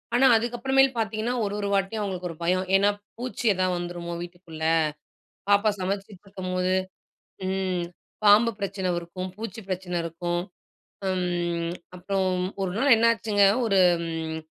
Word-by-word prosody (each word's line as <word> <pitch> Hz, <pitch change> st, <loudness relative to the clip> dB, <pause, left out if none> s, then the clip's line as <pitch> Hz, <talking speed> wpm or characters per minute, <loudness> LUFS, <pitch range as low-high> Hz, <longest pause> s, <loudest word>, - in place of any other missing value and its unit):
ஆனா 265 Hz, +2 st, +5 dB
அதுக்கப்புறமேல் 245 Hz, +4 st, +3 dB
பார்த்தீங்கன்னா, 220 Hz, +2 st, -1 dB
ஒரு, 200 Hz, 0 st, -2 dB
ஒரு 200 Hz, -, -1 dB
வாட்டியும் 200 Hz, +2 st, 0 dB
அவங்களுக்கு 180 Hz, -3 st, -3 dB
ஒரு 165 Hz, -, -8 dB
பயம். 185 Hz, +2 st, +1 dB
ஏன்னா 200 Hz, +1 st, +5 dB, 0.3 s
பூச்சி 245 Hz, 0 st, -5 dB
ஏதாவது 185 Hz, -1 st, +1 dB
வந்துருமோ 175 Hz, -1 st, -5 dB
வீட்டுக்குள்ள. 175 Hz, -2 st, -9 dB, 0.9 s
பாப்பா 205 Hz, +1 st, +5 dB
சமைச்சுக்கிட்ருக்கும்போது. 185 Hz, -1 st, -3 dB, 0.7 s
ம் 185 Hz, -2 st, -1 dB, 0.4 s
பாம்பு 215 Hz, +3 st, +7 dB
பிரச்சனை 195 Hz, -2 st, -2 dB
இருக்கும். 185 Hz, +2 st, -6 dB
பூச்சி 225 Hz, +1 st, -6 dB
பிரச்சனை 180 Hz, -1 st, -3 dB
இருக்கும். 175 Hz, +1 st, -2 dB, 0.7 s
ம் 175 Hz, -2 st, -1 dB, 0.2 s
அப்பறம், 185 Hz, 0 st, 0 dB, 0.2 s
ஒரு 185 Hz, -, -1 dB
நாள் 270 Hz, -3 st, +6 dB
என்னாச்சுங்க, 220 Hz, -3 st, +3 dB, 0.2 s
ஒரு 195 Hz, -4 st, +3 dB, 0.3 s
ம் 160 Hz, -1 st, -3 dB
190 Hz, 125 wpm, -26 LUFS, 175-210 Hz, 0.9 s, பாம்பு